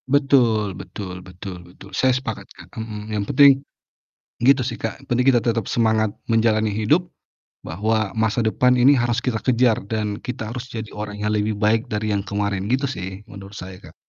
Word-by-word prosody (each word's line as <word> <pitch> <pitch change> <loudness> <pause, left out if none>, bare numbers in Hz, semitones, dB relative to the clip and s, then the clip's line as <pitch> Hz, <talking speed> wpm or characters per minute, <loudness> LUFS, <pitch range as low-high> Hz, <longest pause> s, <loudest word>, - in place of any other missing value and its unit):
Betul 125 -8 +3
betul 90 0 -8
betul 90 0 -9
betul 90 +3 -15
saya 130 - +2
sepakat 125 -4 -6
Kak, - - -14
mhm, 110 -1 -6
yang 105 -1 0
penting, 140 0 +6 0.8
gitu 135 +1 +5
sih - - -3
Kak - - -4
yang 135 - -18
penting 125 0 +1
kita 125 - +4
tetap 115 -2 -1
semangat 110 -2 +2 0.2
menjalani 110 -1 +2
hidup, 135 - +2 0.6
bahwa 110 +4 -1
masa 110 0 0
depan 125 +3 +3
ini 135 +4 +6
harus 120 -2 +1
kita 115 -4 -1
kejar 125 -2 +2
dan 105 -2 -2
kita 115 -3 -5
harus 125 +1 -6
jadi 110 -1 -6
orang 105 0 -6
yang 105 +1 -1
lebih 105 0 -1
baik 110 +1 +1
dari 105 0 -1
yang 100 - 0
kemarin 100 0 -2
gitu 135 +3 +1
sih 95 -4 -6
menurut 100 -1 -11
saya, 95 0 -9
Kak. - - -14
110 Hz, 185 wpm, -22 LUFS, 105-125 Hz, 0.8 s, penting